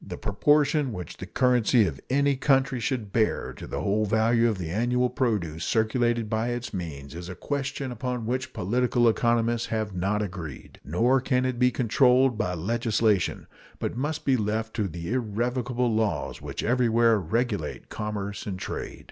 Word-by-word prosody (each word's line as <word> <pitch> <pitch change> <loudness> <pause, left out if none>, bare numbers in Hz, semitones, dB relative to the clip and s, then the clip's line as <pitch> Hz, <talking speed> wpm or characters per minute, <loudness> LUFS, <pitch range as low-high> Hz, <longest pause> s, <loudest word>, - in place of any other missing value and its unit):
The - - -7
proportion 145 +4 +2
which 90 -3 -7
the 95 - -7
currency 125 -1 +3
of 80 - -4
any 140 +1 +3
country 130 -1 +2
should 115 -4 -2
bear 110 -2 +1
to - - -9
the - - -4
whole 105 +2 +1
value 115 +3 +3
of 110 - -2
the 85 -3 -4
annual 125 +5 +1
produce 90 - -1
circulated 115 0 +1
by 110 +1 -1
its 120 -1 -4
means 75 -7 -6
is 85 +2 -7
a 95 - -6
question 135 - -3
upon 125 0 -3
which 130 +2 -2
political 120 +4 +1
economists 115 0 +2
have 110 -2 -2
not 100 +4 0
agreed. 90 -8 -7
Nor 120 - +2
can 130 -1 +1
it 130 -2 -2
be 125 0 +5
controlled 125 +1 +3
by 90 -5 -1
legislation, 110 +1 0 0.3
but - - -3
must 145 +5 -3
be 135 - +4
left 110 +1 -2
to 105 -3 +1
the 85 +4 -5
irrevocable 125 +1 -1
laws 105 -9 -1
which - - -5
everywhere 115 -2 +3
regulate 105 -1 -2
commerce 105 -1 -4
and 95 -2 -3
trade. - - -5
115 Hz, 165 wpm, -26 LUFS, 100-125 Hz, 0.3 s, be